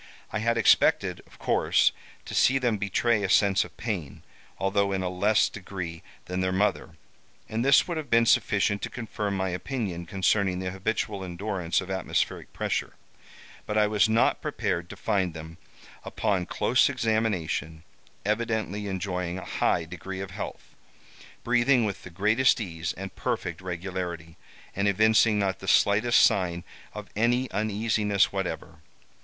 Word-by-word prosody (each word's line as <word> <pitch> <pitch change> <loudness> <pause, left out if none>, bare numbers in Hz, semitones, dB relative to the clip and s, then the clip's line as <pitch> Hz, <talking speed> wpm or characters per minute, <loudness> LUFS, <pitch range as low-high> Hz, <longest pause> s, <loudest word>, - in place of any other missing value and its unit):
I 110 - -2
had 115 +2 +1
expected, 115 - +3
of - - -19
course, - - +2 0.3
to - - -8
see 135 - +4
them 120 -5 0
betray 105 +3 +1
a 100 - -1
sense 100 0 +4
of - - -14
pain, 95 - -4 0.3
although 100 +1 +1
in 95 -1 -1
a 90 - -1
less 100 +4 +2
degree 90 -4 -7 0.2
than 90 +1 -3
their 95 0 0
mother, 95 -4 -1 0.5
and 110 +2 -2
this 140 0 +5
would 170 -2 -3
have 150 -4 -5
been 115 0 +4
sufficient 100 -2 +2
to - - -3
confirm 105 -5 -4
my 95 0 -1
opinion 90 -3 -4
concerning 95 0 +1
the 90 0 -3
habitual 100 +1 -2
endurance 90 -1 -2
of 95 +1 -7
atmospheric 95 -2 -2
pressure. - - -2 0.7
But 105 - -1
I 105 - +5
was 105 +1 +2
not 110 +1 +2
prepared 85 0 -2
to - - -8
find 95 -6 -1
them, 80 +1 -9 0.4
upon 95 -4 -1
close 120 +7 +2
examination, 105 - -1 0.4
evidently 105 -2 -1
enjoying 90 -2 -3
a 95 - -7
high - - 0
degree 95 0 -7
of 95 -1 -6
health, - - -7 0.7
breathing 120 0 +3
with 100 -3 -4
the - - -10
greatest 110 +9 +2
ease 85 -5 -4
and 95 +1 -8
perfect 85 0 -3
regularity, 90 -2 -5 0.4
and 100 +1 +1
evincing 110 +2 +4
not 100 -2 0
the - - -9
slightest 110 +4 +4
sign 85 -3 +2 0.3
of - - -9
any 120 +4 +1
uneasiness 105 -1 +1
whatever. 95 -5 -4
100 Hz, 150 wpm, -27 LUFS, 90-110 Hz, 0.7 s, this